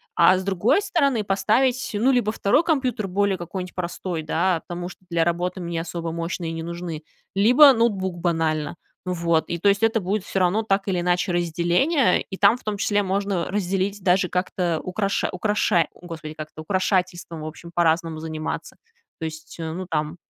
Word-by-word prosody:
А 180 +2 +6
с 190 - -3
другой 200 - +2
стороны 280 - +1
поставить, 225 +6 +1
ну, 245 +6 +3
либо 240 -4 +2
2 220 +9 +2
компьютер, 255 - 0
более 195 +1 +1
какой-нибудь 180 +1 -6
простой, 175 -1 -4
да, 170 +2 +1
потому 175 0 -5
что 180 - -11
для 170 -1 +2
работы 175 +2 -1
мне 170 -1 -3
особо 165 0 -4
мощные 165 0 -3
не 165 0 -4
нужны, 170 -1 -5 0.3
либо 250 +8 +7
ноутбук 195 -6 0
банально. 160 -3 0 0.3
Ну 180 - 0
вот. 170 -2 +1
И 170 - -1
то 200 +4 +3
есть 200 +2 +2
это 225 0 +3
будет 195 +1 -1
всё 195 - -2
равно 185 +5 +2
так 195 -2 0
или 180 -2 0
иначе 180 +2 +1
разделение, 175 - +2
и 190 - -8
там, 205 +3 +5
в - - -21
том 210 -1 -2
числе, 205 0 +1
можно 195 -2 -1
разделить 195 0 -1
даже 180 0 +3
как-то 180 -2 -1
украша 195 +2 -1
украшарь 195 -2 +1
о, 180 - -16
Господи, 155 -2 -7
как 155 0 -7
это, 155 - -9
украшательством, 180 -2 -1
в 155 - -5
общем, 170 +2 -10
по-разному 165 -1 +1
заниматься. 155 -1 -5 0.4
То 160 - -3
есть, 155 0 -8
э, 160 -1 -3
ну 180 +2 -5
там 155 +1 -2
180 Hz, 185 wpm, -23 LUFS, 170-205 Hz, 0.4 s, либо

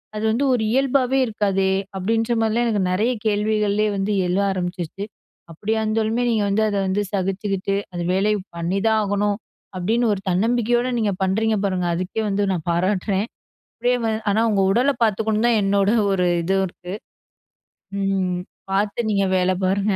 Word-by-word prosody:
அது 215 - -3
வந்து 245 +6 +1
ஒரு 240 -3 +1
இயல்பாவே 265 0 +2
இருக்காதே?" 195 -4 0 0.3
அப்டின்ற 225 +4 0
மாரிலாம் 225 +2 +1
எனக்கு 210 -4 +1
நிறைய 215 +7 +1
கேள்விகள்லே 210 0 +1
வந்து 195 +2 -1 0.2
எழுவ 180 +3 +1
ஆரம்பிச்சுருச்சு. 180 +1 -4 0.5
அப்டியா 215 +7 -2
இருந்தாலுமே 220 +2 0
நீங்க 220 -3 +1
வந்து 210 +2 +1
அத 205 - -1
வந்து 190 +2 0
சகிச்சுக்கிட்டு 195 0 -1 0.2
அந்த 175 -1 -4
வேலைய 205 +3 +2 0.2
பண்ணிதான் 195 +6 +1
ஆகணும். 205 0 0 0.4
அப்டின்னு 225 +6 +1
ஒரு 200 - -3
தன்னம்பிக்கையோடு 240 +5 +1
நீங்க 215 -3 +1
பண்றீங்க 220 +4 +1
பாருங்க, 185 -2 -1
அதுக்கே 185 +5 -3
வந்து 205 0 0
நான் 175 -4 -3
பாராட்றேன். 190 +3 0 0.6
அதேமாதிரி. 245 -2 +1 0.2
ஆனா, 210 +2 +2
உங்க 200 -2 +2
உடல 250 +6 +3
பார்த்துக்கணும் 220 +1 +1
தான் 235 -2 +3
என்னோட 195 0 +2 0.2
ஒரு 180 -2 +1 0.2
இதுவும் 190 +3 +1
இருக்கு. 180 +1 -10 1.1
ம். 190 -2 0 0.3
பார்த்து 205 +4 0
நீங்க 200 -1 +2
வேல 185 0 +2
பாருங்க. 200 +2 +1
205 Hz, 145 wpm, -22 LUFS, 190-220 Hz, 1.1 s, உடல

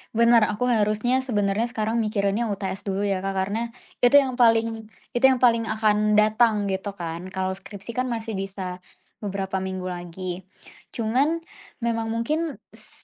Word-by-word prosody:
bener 235 -1 +6
aku 230 +4 -1
harusnya 220 +3 +2
sebenarnya 215 -3 0
sekarang 225 -1 -1
mikirinnya 215 +1 0
UTS 195 -2 -4
dulu 195 +1 -1
ya 195 -2 0
Kak. 195 +1 -3
Karena 205 +5 -1 0.3
itu 245 +3 +5
yang 265 -3 +5
paling 225 -1 +3 0.2
itu 240 +2 +3
yang 260 -2 +2
paling 230 -2 +4
akan 215 -1 +2
datang 215 -1 +3
gitu 190 +1 -3
kan. 170 0 -5
Kalau 190 0 -1
skripsi 195 +3 -9
kan 255 0 +1
masih 225 -3 -3
bisa 190 -2 -5 0.4
beberapa 195 -2 -3
minggu 185 -1 -4
lagi. 180 +1 -5 0.5
Cuman 270 +9 +1 0.4
memang 230 -1 0
mungkin 285 +8 -1 0.2
s - - -14
215 Hz, 150 wpm, -24 LUFS, 195-235 Hz, 0.5 s, bener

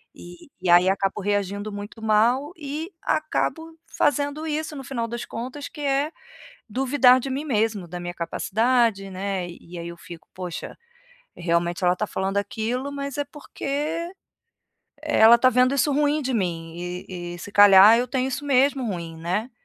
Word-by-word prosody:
e 175 +8 -13
e 185 - -1
aí 175 +2 +6
acabo 195 +1 -1
reagindo 205 +1 -2
muito 205 +2 -8
mal 230 +7 +2
e 305 +3 -5
acabo 320 +1 -2
fazendo 290 +1 0
isso 310 0 -3
no 270 - -7
final 240 -3 -3
das 235 +1 -5
contas 255 +5 -6
que 300 - -10
é: 280 +2 0 0.6
duvidar 260 +1 +4
de 270 - -5
mim 275 +3 -3
mesmo, 215 - 0
da 175 +2 -6
minha 175 0 -5
capacidade, 220 +4 +1
né. 190 -1 -3
E 175 0 -11
aí 170 0 -6
eu 170 - -8
fico: 170 -1 -12
"Poxa, 180 -2 -6 0.6
realmente 170 0 0
ela 180 - +5
está 210 +3 -2
falando 195 +1 -1
aquilo, 225 +6 -3
mas 280 -1 -5
é 290 - 0
porque, 295 +4 -4 0.9
ela 225 +2 +6
está 255 +2 +4
vendo 255 +2 +3
isso 280 +2 +2
ruim 295 +1 +1
de 260 -1 -2
mim 165 -5 -2
e 175 0 -6
e - - -9
se 190 - -9
calhar 205 +2 +8
eu 245 - 0
tenho 260 -1 -1
isso 270 +2 -4
mesmo 275 -1 +2
ruim, 170 -5 -5
né". 180 +9 -2
225 Hz, 170 wpm, -24 LUFS, 185-280 Hz, 0.9 s, calhar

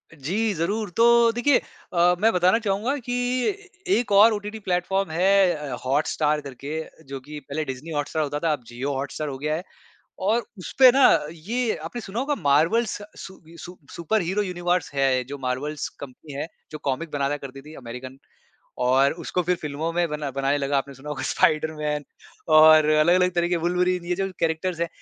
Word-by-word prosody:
जी, 200 +10 -1
ज़रूर 200 +5 -2
तो 235 0 +5
देखिए 240 +4 +3 0.4
अ, 175 +1 +4
मैं 225 +2 +4
बताना 180 +5 +3
चाहूँगा 220 +6 -1
कि 245 -1 -5 0.4
ए 410 -1 -7 0.3
एक 235 -3 -2
और 215 +3 +7
ओटीटी 210 +1 -5
प्लेटफ़ॉर्म 190 0 -1
है 190 +2 +4
अ, 145 -4 -5
हॉटस्टार 150 +2 +1
करके 140 +3 -6 0.3
जो 135 -1 -6
कि 150 +3 -9
पहले 155 +2 -2
डिज़नी 135 +5 -7
हॉटस्टार 150 +1 -1
होता 145 0 -3
था 165 - +2
अब 135 - -6
जियो 130 +4 -4
हॉटस्टार 140 +3 -4
हो 135 - -5
गया 150 +2 -1
है 170 - -5 0.6
और 220 +5 +2 0.2
उसपे 255 +7 +5
ना 275 - +4 0.3
ये 225 +9 -2
आपने 240 - -5
सुना 205 +1 -6
होगा 290 +2 0
मार्वल 160 +12 +3
स 210 -1 -5
सु 190 - -10 0.2
सु 180 +1 -10 0.2
सुपर 205 +6 0
हीरो 190 +5 0
यूनिवर्स 175 -3 -1
है 135 -2 +2
जो 140 +3 -8
मार्वल्स 135 +3 -3
कंपनी 140 +2 -12
है, 140 +3 -4 0.2
जो 155 - -7
कॉमिक 150 +3 -3
बनाता 145 0 -1
करती 135 -1 -9
थी 155 +2 -12
अमेरिकन 130 +2 -9 0.7
और 135 +3 +4
उसको 180 - -1
फिर 180 +2 +1
फ़िल्मों 155 +1 -4
में 175 0 +1
बना 150 -2 -3
बनाने 135 +2 0
लगा। 140 0 0
आपने 140 0 -3
सुना 135 +3 -10
होगा 135 -3 -4
स्पाइडरमैन 150 -1 0 0.5
और 155 0 +8
अलग-अलग 175 +4 +4
तरीके 175 0 +1
वूल्वरिन 180 +1 0
ये 180 0 -1
जो 195 0 -2
कैरेक्टर्स 165 +1 -1
हैं, 170 - 0
160 Hz, 180 wpm, -24 LUFS, 145-195 Hz, 0.7 s, और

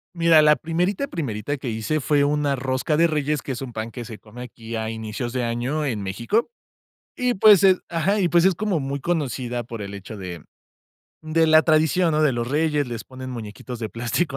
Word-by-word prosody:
Mira, 165 -2 +5
la 150 0 +6
primerita, 180 - -1
primerita 140 - -3
que 130 -2 -5
hice 110 +8 -1
fue 145 +1 +2
una 145 -1 +1
rosca 130 +4 -1
de 170 +1 +5
reyes, 150 -2 -1
que 135 - -5
es 130 +1 -4
un 125 -3 -8
pan 110 +1 -4
que 120 +1 -7
se 110 -2 -9
come 120 +3 -11
aquí 115 -1 -8
a 110 0 -2
inicios 110 +2 -5
de 125 -1 -1
año 125 +6 -1
en 110 -7 -2
México. 120 - -1 0.6
Y, 250 -1 0
pues, 205 -1 +7
eh 190 -1 +6
ajá, 170 +5 +1
y 180 - +2
pues 175 +2 +5
es 190 - +4
como 195 -4 -1
muy 140 +1 -3
conocida 130 -7 -2
por 115 -2 -7
el 100 0 -6
hecho 100 +2 -8
de 90 -4 -7 0.8
de 160 +1 +2
la 155 0 +7
tradición, 160 +2 +3
¿no?, 155 - +2
de 150 - +4
los 120 -1 -2
reyes, 150 +1 +1
les 120 -2 -5
ponen 130 0 -9
muñequitos 115 +1 -7
de 110 -1 -4
plástico 120 - -2
140 Hz, 215 wpm, -23 LUFS, 115-160 Hz, 0.8 s, pues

